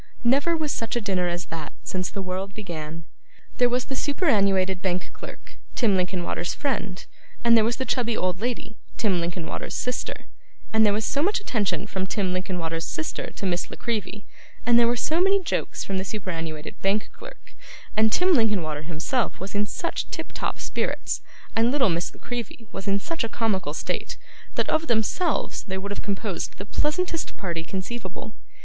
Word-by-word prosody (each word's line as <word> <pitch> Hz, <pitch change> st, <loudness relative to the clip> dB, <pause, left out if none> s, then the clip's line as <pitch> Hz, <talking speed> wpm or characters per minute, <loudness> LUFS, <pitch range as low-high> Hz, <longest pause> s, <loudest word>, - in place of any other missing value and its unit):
Never 280 Hz, +8 st, +4 dB
was 305 Hz, -2 st, 0 dB
such 230 Hz, 0 st, -1 dB
a -, -, +3 dB
dinner 190 Hz, -5 st, +1 dB
as 175 Hz, 0 st, -1 dB
that, 160 Hz, -2 st, -5 dB
since 185 Hz, -1 st, -1 dB
the 195 Hz, -, -3 dB
world 190 Hz, +2 st, -3 dB
began. 165 Hz, -5 st, -5 dB, 0.6 s
There 245 Hz, -1 st, +6 dB
was 250 Hz, +1 st, +1 dB
the 270 Hz, -, -3 dB
superannuated 200 Hz, -, +3 dB
bank 185 Hz, -1 st, 0 dB
clerk, -, -, -10 dB, 0.2 s
Tim 220 Hz, -6 st, +4 dB
Linkinwater's 180 Hz, -1 st, 0 dB
friend; 200 Hz, -9 st, -1 dB, 0.4 s
and 235 Hz, -1 st, +7 dB
there 225 Hz, -, +7 dB
was 235 Hz, +2 st, +2 dB
the 260 Hz, -, -1 dB
chubby 235 Hz, -4 st, +1 dB
old 185 Hz, -1 st, +1 dB
lady, 225 Hz, -2 st, -2 dB, 0.2 s
Tim 195 Hz, -6 st, +2 dB
Linkinwater's 170 Hz, 0 st, -3 dB
sister; 250 Hz, 0 st, -2 dB, 0.5 s
and 220 Hz, 0 st, +6 dB
there 210 Hz, -, +6 dB
was 215 Hz, +2 st, +1 dB
so 280 Hz, -, +1 dB
much 395 Hz, +7 st, +3 dB
attention 205 Hz, -, 0 dB
from 190 Hz, -2 st, -2 dB
Tim 190 Hz, -3 st, 0 dB
Linkinwater's 170 Hz, -3 st, -1 dB
sister 155 Hz, -, -3 dB
to -, -, -4 dB
Miss 180 Hz, -2 st, 0 dB
La -, -, -6 dB
Creevy, 210 Hz, -3 st, -2 dB, 0.4 s
and 235 Hz, 0 st, +7 dB
there 235 Hz, -, +6 dB
were 240 Hz, -, +3 dB
so 315 Hz, +7 st, +2 dB
many 390 Hz, +1 st, +5 dB
jokes 375 Hz, -, -1 dB
from 195 Hz, -1 st, -1 dB
the -, -, -1 dB
superannuated 165 Hz, -7 st, -4 dB
bank 200 Hz, +2 st, +1 dB
clerk, -, -, -12 dB, 0.4 s
and 220 Hz, 0 st, +5 dB
Tim 365 Hz, +7 st, +5 dB
Linkinwater 195 Hz, -, +2 dB
himself 170 Hz, -, -1 dB
was 190 Hz, +1 st, -5 dB
in 205 Hz, 0 st, +2 dB
such -, -, -2 dB
tiptop -, -, -3 dB
spirits, -, -, -1 dB, 0.3 s
and 230 Hz, +1 st, +5 dB
little 265 Hz, -4 st, +4 dB
Miss 170 Hz, 0 st, 0 dB
La -, -, -16 dB
Creevy 240 Hz, -1 st, -5 dB
was 195 Hz, 0 st, -6 dB
in 200 Hz, 0 st, +3 dB
such 330 Hz, -, -2 dB
a 230 Hz, -, -1 dB
comical 190 Hz, -11 st, 0 dB
state, -, -, -2 dB, 0.4 s
that -, -, +2 dB
of 320 Hz, +1 st, +2 dB
themselves 240 Hz, -, +1 dB
they 190 Hz, -3 st, -4 dB
would 200 Hz, +1 st, -4 dB
have 205 Hz, -, -2 dB
composed 200 Hz, -1 st, -2 dB
the 195 Hz, -, -5 dB
pleasantest 325 Hz, -, 0 dB
party 170 Hz, -4 st, -2 dB
conceivable. 195 Hz, +3 st, -5 dB
205 Hz, 180 wpm, -26 LUFS, 185-240 Hz, 0.6 s, and